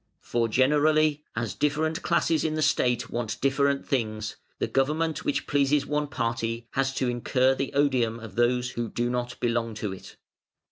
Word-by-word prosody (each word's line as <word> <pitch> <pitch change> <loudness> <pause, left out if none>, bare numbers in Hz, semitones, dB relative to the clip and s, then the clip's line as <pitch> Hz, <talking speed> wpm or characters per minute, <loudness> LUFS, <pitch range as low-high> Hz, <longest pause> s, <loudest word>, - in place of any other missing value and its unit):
For 115 -1 0
generally, 150 +4 +3
as 110 -3 -2
different 155 - 0
classes 165 -2 +1
in 155 -1 0
the 155 - 0
State 125 -4 +1
want 120 -2 -3
different 140 +1 +1
things, 110 -4 -2 0.2
the - - 0
government 150 +2 0
which - - -1
pleases 145 0 +2
one 150 0 -1
party 115 -3 -2
has 135 0 0
to 130 - 0
incur 125 +2 +2
the 135 0 -3
odium 130 -5 +2
of 110 -3 -9
those 125 +2 +1
who 120 -1 -3
do 120 +2 -1
not 120 -1 -3
belong 115 -2 -1
to 105 -2 -3
it. 95 - -11
130 Hz, 170 wpm, -26 LUFS, 115-145 Hz, 0.2 s, generally